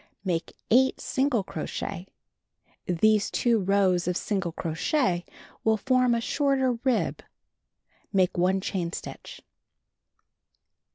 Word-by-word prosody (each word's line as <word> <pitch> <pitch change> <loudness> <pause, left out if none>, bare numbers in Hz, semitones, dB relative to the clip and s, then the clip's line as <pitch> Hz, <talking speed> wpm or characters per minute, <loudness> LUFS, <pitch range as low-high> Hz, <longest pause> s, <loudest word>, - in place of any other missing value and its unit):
Make 170 -3 -2 0.2
8 260 +3 +4
single 265 -5 0
crochet. 190 0 -5 0.8
These 210 +4 +3
two 235 -2 +2
rows 190 -2 +2
of 180 - 0
single 195 -5 -2
crochet 175 - 0 0.4
will 220 0 +3
form 255 +1 +2
a 230 - -1
shorter 265 -1 +1 1.4
Make 185 -3 +2
1 185 +2 +2
chain 180 -3 -2
stitch. - - -8
200 Hz, 100 wpm, -27 LUFS, 180-245 Hz, 1.4 s, 8